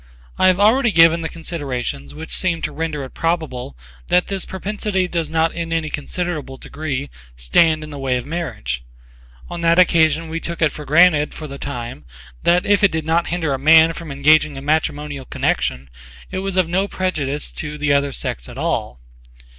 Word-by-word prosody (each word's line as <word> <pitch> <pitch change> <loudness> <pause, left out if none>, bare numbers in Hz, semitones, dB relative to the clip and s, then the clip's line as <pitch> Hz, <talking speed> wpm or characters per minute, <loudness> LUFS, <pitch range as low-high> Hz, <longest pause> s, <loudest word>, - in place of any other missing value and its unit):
I 185 - +5
have 185 0 +3
already 230 +4 +4
given 165 -1 +5
the 160 - -3
considerations 135 - -4
which 160 +1 -4
seem 175 -3 0
to 150 - -2
render 150 -1 -3
it 130 - -8
probable 160 - -2 0.3
that 180 - +3
this 195 -2 -1
propensity 190 0 -2
does 165 -3 -2
not 160 +1 +1
in 165 -1 -4
any 160 -2 -1
considerable 150 -3 -4
degree 140 -1 -5 0.2
stand 155 - +3
in 155 - -9
the 145 - -7
way 130 -2 0
of 125 - -5
marriage: 70 - -4 0.6
on 175 -1 -6
that 170 0 +3
occasion 165 -3 +4
we 165 +1 -4
took 170 0 -6
it 155 -3 +3
for 150 - -9
granted 155 0 +4
for 155 - -7
the 140 -2 -8
time 120 - -6 0.4
that 175 +1 +3
if 205 0 +3
it 200 - +6
did 160 -1 -3
not 165 +1 +1
hinder 165 -4 -1
a 135 - -2
man 160 +3 +6
from 165 -2 -8
engaging 150 +1 +3
in 135 - -8
matrimonial 150 -2 -1
connection, 65 - -1 0.4
it 185 - -3
was 195 -1 -3
of 185 -3 +3
no 190 +4 0
prejudice 150 -8 -2
to 150 -1 -6
the 150 -1 +1
I - - +6
other 140 0 -1
sex - - -4
at - - -10
all. 60 - -2
160 Hz, 195 wpm, -20 LUFS, 140-170 Hz, 0.6 s, it